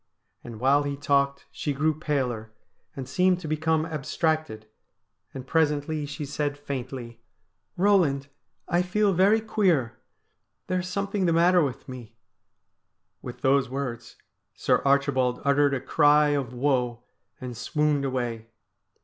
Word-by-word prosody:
And 115 Hz, -3 st, -9 dB
while 135 Hz, +4 st, +4 dB
he 140 Hz, -1 st, -3 dB
talked 140 Hz, -1 st, +1 dB
she 145 Hz, -, -3 dB
grew 155 Hz, +3 st, +1 dB
paler, 130 Hz, -8 st, -2 dB, 0.4 s
and 135 Hz, -2 st, -6 dB
seemed 180 Hz, +6 st, +2 dB
to 160 Hz, -, -6 dB
become 155 Hz, +1 st, 0 dB
abstracted, 155 Hz, -5 st, -2 dB, 0.7 s
and 130 Hz, -1 st, -8 dB
presently 150 Hz, +1 st, 0 dB
she 145 Hz, +1 st, -5 dB
said 145 Hz, +1 st, -3 dB
faintly: 130 Hz, -4 st, -6 dB, 0.3 s
' 180 Hz, -, -49 dB
Eoland, 175 Hz, -8 st, +3 dB, 0.4 s
I 175 Hz, 0 st, +2 dB
feel 200 Hz, +2 st, +1 dB
very 195 Hz, +5 st, +4 dB
queer. 175 Hz, -, 0 dB, 0.7 s
There 185 Hz, 0 st, -1 dB
is 180 Hz, -, -4 dB
something 200 Hz, 0 st, -1 dB
the 165 Hz, -, +2 dB
matter 175 Hz, +2 st, +4 dB
with 135 Hz, -5 st, -3 dB
me.' 125 Hz, -4 st, -10 dB, 1.1 s
With -, -, -9 dB
those 135 Hz, -1 st, +2 dB
words 125 Hz, -3 st, -5 dB, 0.4 s
Sir -, -, +1 dB
Archibald 135 Hz, -3 st, +2 dB
uttered 140 Hz, 0 st, +3 dB
a -, -, -2 dB
cry 150 Hz, +2 st, +4 dB
of 140 Hz, -4 st, -1 dB
woe, 125 Hz, -2 st, -1 dB, 0.4 s
and 125 Hz, -1 st, -7 dB
swooned 150 Hz, +4 st, 0 dB
away. 120 Hz, -4 st, -3 dB
145 Hz, 135 wpm, -26 LUFS, 130-160 Hz, 1.1 s, while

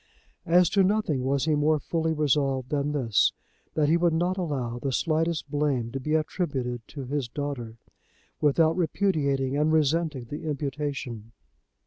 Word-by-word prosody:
As 175 Hz, +1 st, +5 dB
to 200 Hz, -2 st, +4 dB
nothing 185 Hz, -9 st, +1 dB
was 135 Hz, +1 st, +1 dB
he 155 Hz, -, +2 dB
more 150 Hz, +1 st, +3 dB
fully 160 Hz, +2 st, -1 dB
resolved 135 Hz, -4 st, +1 dB
than 145 Hz, 0 st, 0 dB
this, 120 Hz, -9 st, +2 dB, 0.4 s
that 150 Hz, -2 st, +2 dB
he 165 Hz, +3 st, +4 dB
would 170 Hz, -1 st, +2 dB
not 175 Hz, +3 st, +1 dB
allow 135 Hz, -10 st, -3 dB
the 135 Hz, +2 st, -2 dB
slightest 160 Hz, +1 st, 0 dB
blame 140 Hz, -6 st, 0 dB
to 135 Hz, -, -3 dB
be 150 Hz, +4 st, -1 dB
attributed 140 Hz, -7 st, -2 dB
to 140 Hz, -3 st, -7 dB
his 140 Hz, -1 st, -2 dB
daughter, 125 Hz, -5 st, -5 dB, 0.6 s
without 160 Hz, +2 st, +3 dB
repudiating 145 Hz, -7 st, 0 dB
and 150 Hz, +2 st, +2 dB
resenting 155 Hz, -2 st, +1 dB
the 150 Hz, +6 st, -6 dB
imputation. 135 Hz, -6 st, -4 dB
145 Hz, 150 wpm, -26 LUFS, 135-160 Hz, 0.6 s, As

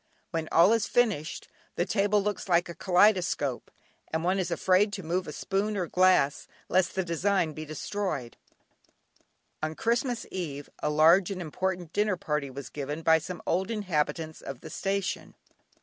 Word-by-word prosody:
When 165 Hz, -3 st, -2 dB
all 175 Hz, +6 st, +6 dB
is 225 Hz, -2 st, +1 dB
finished, 190 Hz, -8 st, 0 dB, 0.3 s
the 175 Hz, -, +1 dB
table 205 Hz, 0 st, +2 dB
looks 205 Hz, -1 st, -3 dB
like 175 Hz, 0 st, +3 dB
a 170 Hz, -, -6 dB
kaleidoscope, 180 Hz, -, +2 dB, 0.4 s
and 160 Hz, +1 st, -1 dB
one 185 Hz, +2 st, +1 dB
is 180 Hz, -2 st, -1 dB
afraid 185 Hz, +4 st, +3 dB
to 195 Hz, -, -5 dB
move 175 Hz, +3 st, -1 dB
a -, -, -4 dB
spoon 205 Hz, +5 st, -1 dB
or 180 Hz, -, 0 dB
glass 180 Hz, -6 st, +3 dB, 0.2 s
lest 185 Hz, -1 st, +2 dB
the 190 Hz, -, +1 dB
design 175 Hz, 0 st, 0 dB
be 155 Hz, +1 st, -7 dB
destroyed. 155 Hz, -, -4 dB, 1.3 s
On 155 Hz, 0 st, -2 dB
Christmas 235 Hz, -, 0 dB
eve 145 Hz, -6 st, -5 dB
a 150 Hz, -, 0 dB
large 165 Hz, +5 st, +5 dB
and 195 Hz, -2 st, -4 dB
important 180 Hz, 0 st, -3 dB
dinner 205 Hz, -2 st, +1 dB
party 150 Hz, -7 st, -2 dB
was 135 Hz, +1 st, -8 dB
given 150 Hz, +2 st, -5 dB
by 160 Hz, 0 st, +5 dB
some 175 Hz, +2 st, -7 dB
old 190 Hz, +4 st, 0 dB
inhabitants 165 Hz, -6 st, -2 dB
of 135 Hz, -2 st, -7 dB
the 160 Hz, -, -9 dB
station. 195 Hz, +2 st, -2 dB
180 Hz, 165 wpm, -28 LUFS, 155-195 Hz, 1.3 s, all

